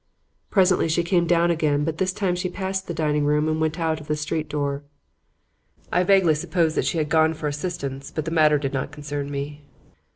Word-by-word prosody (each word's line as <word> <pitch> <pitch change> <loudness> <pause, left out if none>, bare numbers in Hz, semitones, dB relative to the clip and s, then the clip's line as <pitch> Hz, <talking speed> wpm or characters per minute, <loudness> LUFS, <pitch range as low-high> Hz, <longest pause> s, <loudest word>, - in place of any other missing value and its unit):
Presently 185 -4 +3
she 170 +2 +1
came 170 0 +2
down 170 0 +3
again, 150 -3 +1
but 160 +1 -3
this 185 0 +1
time 185 -1 -1
she 180 +1 -2
passed 190 +1 -3
the 170 - -3
dining 150 -2 +1
room 150 +1 +2
and 155 0 0
went 160 +1 -1
out 160 -1 -1
of 150 - -13
the 150 - 0
street 155 +1 -3
door. 145 -1 -2 1.1
I 180 - +3
vaguely 190 -3 +4
supposed 160 +1 0
she - - 0
had 155 -2 0
gone 160 +1 +3
for 155 -1 -3
assistance, 145 -3 -4
but 155 - -4
the 165 - -3
matter 155 -2 +4
did 140 -1 -3
not 135 +1 -2
concern 145 -1 -5
me. 145 +1 -5
155 Hz, 205 wpm, -23 LUFS, 150-175 Hz, 1.1 s, vaguely